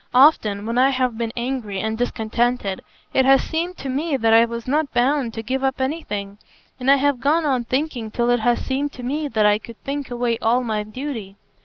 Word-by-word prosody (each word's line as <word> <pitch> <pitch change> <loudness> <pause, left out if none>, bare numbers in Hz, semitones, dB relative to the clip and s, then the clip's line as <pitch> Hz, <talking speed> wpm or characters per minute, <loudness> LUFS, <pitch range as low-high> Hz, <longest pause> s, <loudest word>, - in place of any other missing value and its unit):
"Often, 220 -7 +4
when 230 +2 0
I 265 +1 +5
have 255 -3 0
been 230 0 -3
angry 235 -5 -3
and 220 +2 -2
discontented, 235 -3 -1 0.3
it 265 - +4
has 270 +1 +5
seemed 345 +3 -3
to 275 - -6
me 280 +3 -1
that 225 -2 +3
I 230 +1 +7
was 235 0 -6
not 290 +1 0
bound 255 0 +2
to 225 - -4
give 265 +3 -2
up 265 0 0
anything; 210 -8 -3 0.4
and 255 +1 0
I 275 - +8
have 280 -1 +1
gone 310 +4 +2
on 255 -4 0
thinking 255 -3 -2
till 240 +2 0
it 245 - +3
has 240 +2 +1
seemed 280 +2 -2
to 250 - -9
me 295 +4 -2
that 220 -5 +1
I 210 0 +4
could 230 0 -12
think 280 0 -4
away 240 -1 -1
all 240 +3 +2
my 220 -3 -1
duty. 215 -2 -6
245 Hz, 215 wpm, -22 LUFS, 225-275 Hz, 0.4 s, I